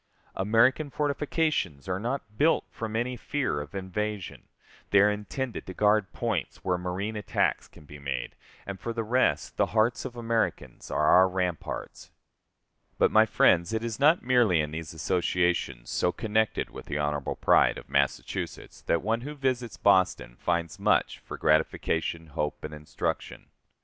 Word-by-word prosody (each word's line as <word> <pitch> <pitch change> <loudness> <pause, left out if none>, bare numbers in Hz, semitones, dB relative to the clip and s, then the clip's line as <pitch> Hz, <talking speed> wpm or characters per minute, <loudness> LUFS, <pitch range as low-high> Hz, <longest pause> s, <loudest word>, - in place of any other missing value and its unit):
American 115 +9 +3
fortifications 145 - -1
are 90 0 -1
not 115 -1 -4
built 155 +8 +3
from 110 -1 -5
any 120 +2 -1
fear 130 - -2
of 75 +5 -10
invasion, 100 +1 -4 0.4
they 100 - +5
are 105 +1 +5
intended 110 +4 -4
to 95 - -7
guard 105 -2 +3
points - - -3
where 90 - +2
marine 95 +5 -3
attacks 105 - 0
can 75 - -17
be 75 0 -11
made; 70 -3 -4 0.3
and, 100 -1 -6
for 115 - -4
the 115 0 -2
rest, 125 +4 +1
the - - +3
hearts 115 +3 +2
of 125 -2 -6
Americans 115 - -2
are 75 - +1
our 95 +4 +6
ramparts. 90 -3 -4 0.9
But, - - +3
my - - +6
friends, 85 +4 +3
it 110 0 -1
is 115 0 -4
not 155 +5 +4
merely 120 -8 +4
in 75 -1 -1
these 80 -1 -6
associations, 85 -6 0
so 90 - +1
connected 110 +2 0
with - - -10
the 75 - -2
honorable 75 -1 -1
pride - - +4
of - - -10
Massachusetts, 70 0 -2
that 85 - 0
one 115 +3 0
who 145 +4 -6
visits 125 -8 -2
Boston 95 -11 +2
finds 85 -2 -2
much - - +2
for - - -8
gratification, 80 +1 +1
hope, 75 -1 -4
and 75 - -6
instruction. 75 0 -4
100 Hz, 160 wpm, -28 LUFS, 85-115 Hz, 0.9 s, our